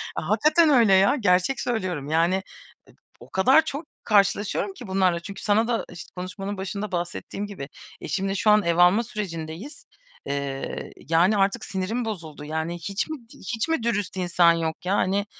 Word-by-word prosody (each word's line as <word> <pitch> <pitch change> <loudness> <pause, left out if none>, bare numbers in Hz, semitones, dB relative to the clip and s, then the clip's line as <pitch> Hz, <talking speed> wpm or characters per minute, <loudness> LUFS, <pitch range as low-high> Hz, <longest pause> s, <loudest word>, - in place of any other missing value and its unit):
A, 155 - -4
hakikaten 305 +9 +4
öyle 230 -8 +5
ya. 195 +6 +5
Gerçek 185 +6 +2
söylüyorum. 185 - -2
Yani 165 +4 +3
ı - - -4 0.8
o - - -14
kadar 265 +12 +4
çok 300 +1 -5 0.2
karşılaşıyorum 200 -1 +2
ki - - -10
bunlarla 185 -2 +2
çünkü 195 +3 -9
sana 215 +2 +2
da 235 -1 -1
işt 175 - -10
konuşmanın 190 +2 -5
başında 200 +2 -4
bahsettiğim 175 +3 -4
gibi, 165 -10 -8 0.3
eşimle 195 0 -2
şu 210 +2 +2
an 210 0 +5
ev 170 0 +1
alma 180 +6 +5
sürecindeyiz. 185 - -6 0.4
Eee, 140 -1 -4 0.2
yani, 180 +6 +4
artık 200 +4 +1
sinirim 210 +6 -2
bozuldu. 160 -9 -6
Yani, 160 +2 -3
hiç 200 - -3
mi 310 - -4
d 230 -1 -18
hiç 225 +1 -3
mi 305 -8 0
dürüst 205 -5 -1
insan 175 -1 +4
yok 165 +1 -3
ya? 195 +2 +1
Hani, 200 +2 +1
195 Hz, 170 wpm, -25 LUFS, 175-215 Hz, 0.8 s, öyle